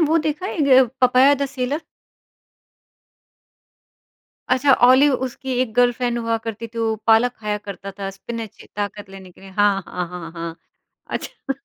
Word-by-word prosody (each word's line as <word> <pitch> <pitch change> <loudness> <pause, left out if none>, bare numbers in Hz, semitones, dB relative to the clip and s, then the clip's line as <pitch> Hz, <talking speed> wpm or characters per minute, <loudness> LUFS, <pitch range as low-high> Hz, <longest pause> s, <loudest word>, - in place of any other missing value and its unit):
वो 320 0 +3
देखा 305 +4 -2
है - - -4
एक 295 - +1
य 260 -1 +7 0.2
पपाया 255 +3 +6
द 280 0 -1
सेलर? 270 +2 -3 2.7
अच्छा 260 +2 +4 0.2
ऑलिव 270 +3 +6
उसकी 260 +1 -4
एक 250 -4 -1
गर्लफ्रेंड 245 0 +2
हुआ 230 -1 0
करती 225 +1 -4
थी, 230 +1 -10
वो 225 -1 +1
पालक 225 +2 +5
खाया 210 -1 -2
करता 200 -1 -8
था, 195 -1 -3
स्पिनच 220 +2 -8
ताकत 205 -1 -4
लेने 190 -1 -11
के - - -21
लिए। 195 - -12
हाँ, 200 0 +2
हाँ, 180 -1 -4
हाँ, 175 -2 -8
हाँ। 165 -1 -6 0.5
अच्छा - - -6
230 Hz, 160 wpm, -21 LUFS, 200-260 Hz, 2.7 s, य